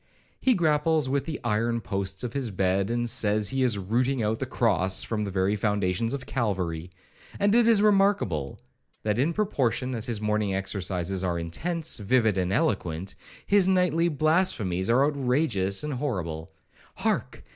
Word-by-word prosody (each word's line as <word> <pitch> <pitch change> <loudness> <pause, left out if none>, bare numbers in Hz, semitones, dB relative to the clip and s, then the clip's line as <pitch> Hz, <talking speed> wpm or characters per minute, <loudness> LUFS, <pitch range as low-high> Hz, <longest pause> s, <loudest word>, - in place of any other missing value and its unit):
He 255 -2 +3
grapples 155 -3 +2
with 140 +1 -1
the 160 - -5
iron 115 +1 0
posts 95 -2 -3
of 120 -1 -4
his 135 -4 -1
bed, 95 0 0
and 120 0 -1
says 105 -2 +1
he 135 0 -1
is 120 -5 +3
rooting 120 +6 0
out 110 +1 -1
the 130 - -3
cross 95 -7 +1
from 105 -2 -2
the - - -4
very 95 +2 0
foundations 105 +3 0
of 130 -2 -7
Calvary; 90 -8 -2 0.5
and 200 0 +2
it 235 0 +4
is 220 -3 +5
remarkable, 195 - +1 0.4
that 105 +1 0
in 145 +6 +2
proportion 130 - -1
as 115 -3 -2
his 115 -3 -2
morning 105 -2 0
exercises 95 -1 -2
are 90 -2 -1
intense, 160 - -1
vivid, 110 0 +2
and 90 -1 -1
eloquent, 95 -3 -1 0.3
his 200 -2 +4
nightly 180 -3 +2
blasphemies 150 - +1
are 130 +4 +4
outrageous 125 -8 +1
and 150 -1 -3
horrible—Hark! 85 - -4
115 Hz, 155 wpm, -26 LUFS, 95-145 Hz, 0.5 s, is